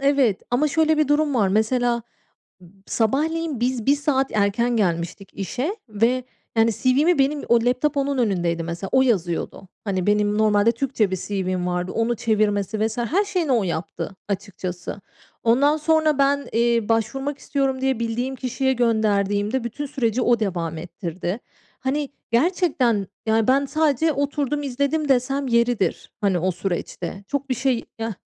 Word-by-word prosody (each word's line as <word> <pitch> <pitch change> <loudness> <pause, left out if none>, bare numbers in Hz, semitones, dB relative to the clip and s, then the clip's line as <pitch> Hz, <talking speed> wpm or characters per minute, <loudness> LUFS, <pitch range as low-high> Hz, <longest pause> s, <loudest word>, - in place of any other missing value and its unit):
Evet, 275 -7 +2
ama 265 +5 +2
şöyle 315 +1 +2
bir 305 -2 +2
durum 295 -1 +2
var. 210 -6 +3
Mesela 235 +4 +1 0.6
b 175 - -15 0.2
sabahleyin 300 +5 0
biz 245 -2 -1
1 280 +1 +5
saat 280 -2 0
erken 215 +4 +1
gelmiştik 180 0 -1
işe 250 - -3
ve, 230 +5 +1 0.3
yani, 225 +1 +4
CV'mi 280 - +2
benim 285 +2 +1
o 235 - +6
laptop 270 +4 +1
onun 280 0 0
önündeydi 175 -7 0
mesela, 170 +3 -5
o 260 - +6
yazıyordu. 190 -5 -1 0.2
Hani, 190 -3 -2
benim 210 0 +2
normalde 215 0 +4
Türkçe 235 -4 0
bir - - +1
CV'm 185 -2 -2
vardı. 180 +1 -2
Onu 230 +1 0
çevirmesi 215 -2 +1
vs. 225 - -7
her 315 - +1
şeyini 355 -7 -1
o 235 -4 +3
yaptı 170 +2 -4
açıkçası. 185 -1 -5 0.4
Ondan 280 +6 +4
sonra 310 -1 +2
ben, 280 -1 +2
eee, 235 -1 +2
başvurmak 270 +5 0
istiyorum 270 -2 -1
diye 265 -3 +1
bildiğim 235 +3 -2
kişiye 265 +1 0
gönderdiğimde, 215 -1 +1
bütün 240 +5 -4
süreci 255 -4 -1
o 240 -2 +3
devam 170 -6 -2
ettirdi. 175 +3 -5 0.4
Hani, 275 +2 -1 0.2
gerçekten, 250 - +2 0.2
yani, 220 0 +2
ben 275 +2 +3
sadece 310 +1 +1
oturdum, 285 +1 -1
izledim 280 +3 -1
desem 270 +2 +1
yeridir. 235 -3 +1
Hani, 195 -4 +2
o 185 +3 +1
süreçte. 180 +1 -4
Çok 280 -1 -3
bir 255 - +1
şey 250 -1 0
ya 225 -2 -3
235 Hz, 155 wpm, -23 LUFS, 205-275 Hz, 0.6 s, o